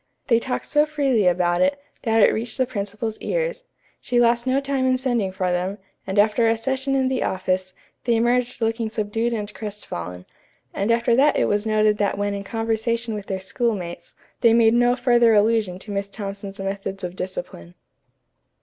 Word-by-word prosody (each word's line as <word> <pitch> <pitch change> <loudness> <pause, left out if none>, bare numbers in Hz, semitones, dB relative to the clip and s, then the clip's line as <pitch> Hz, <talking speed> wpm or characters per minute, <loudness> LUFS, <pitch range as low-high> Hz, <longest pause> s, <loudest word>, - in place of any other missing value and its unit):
They 230 -2 +5
talked 255 +2 -3
so 295 +1 +2
freely 270 -9 +1
about 175 0 +2
it, 280 +1 +2 0.2
that 225 -1 +2
it - - +5
reached 225 0 -3
the 260 - +2
principal's 215 -1 -4
ears. - - -2 0.3
She 245 -1 0
lost 235 +1 +3
no 260 +1 +3
time 275 -2 -1
in 255 0 +3
sending 240 -7 0
for 185 -1 -1
them, 180 +3 -1 0.3
and 190 +1 -3
after 215 +3 +4
a 225 0 +2
session 265 +3 -1
in 265 -1 +2
the 260 -1 -1
office, 185 0 -1 0.3
they 235 -1 +3
emerged 240 +1 +1
looking 225 0 0
subdued 220 +2 -1
and 210 -2 -4
crestfallen; 90 - -6 0.5
and 200 +3 -1
after 235 0 +3
that 290 +3 +4
it - - +3
was 205 +1 0
noted 215 -1 +2
that 200 -1 0
when 205 0 -1
in 200 0 -4
conversation 225 +2 -1
with 205 -2 -6
their 190 -1 -2
schoolmates, 190 -5 -3 0.2
they 230 -1 +5
made 230 -1 +5
no 245 +1 +4
further 240 -3 +4
allusion 210 -3 +2
to 205 +3 -9
Miss 200 0 -2
Thompson's 200 -1 -7
methods 195 0 -4
of 180 0 -4
discipline. 175 - -6
225 Hz, 185 wpm, -23 LUFS, 195-240 Hz, 0.5 s, They